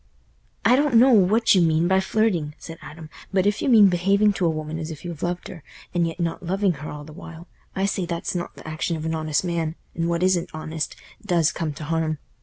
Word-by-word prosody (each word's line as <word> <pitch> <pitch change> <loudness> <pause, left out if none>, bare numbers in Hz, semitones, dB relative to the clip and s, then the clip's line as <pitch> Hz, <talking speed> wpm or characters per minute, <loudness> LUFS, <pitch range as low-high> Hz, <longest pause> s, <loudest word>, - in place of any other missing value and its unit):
"I 245 - +6
don't 285 -2 +2
know 255 +4 +7
what 220 +1 +4
you 185 - +5
mean 165 0 +3
by 190 +1 +3
flirting," 190 -7 0
said 165 -1 -10
Adam, 155 -1 -11 0.2
"but 190 -1 +2
if 205 +1 +1
you - - 0
mean 215 -5 +8
behaving 195 +3 +3
to 185 -3 0
a - - +3
woman 155 0 -4
as 160 0 -5
if 160 +1 -9
you 170 -1 -4
loved 175 0 -3
her, 165 - -10 0.3
and 170 -1 +2
yet 165 +2 -6
not 170 -1 -2
loving 190 +2 +1
her 150 - -6
all 150 0 -7
the 155 +1 -12
while, 165 +2 -11 0.3
I 195 - 0
say 190 -3 -1
that's 170 -1 -3
not 175 -1 -5
th' - - -12
action 155 +1 -2
of 155 - -6
an 160 - -1
honest 155 -1 0
man, 165 -2 -2 0.2
and 165 0 -1
what 170 +1 0
isn't 185 -2 +2
honest 155 0 -4 0.3
does 170 -6 +2
come 160 -2 -3
t' 150 - -8
harm. 160 0 -1
170 Hz, 235 wpm, -23 LUFS, 160-190 Hz, 0.3 s, mean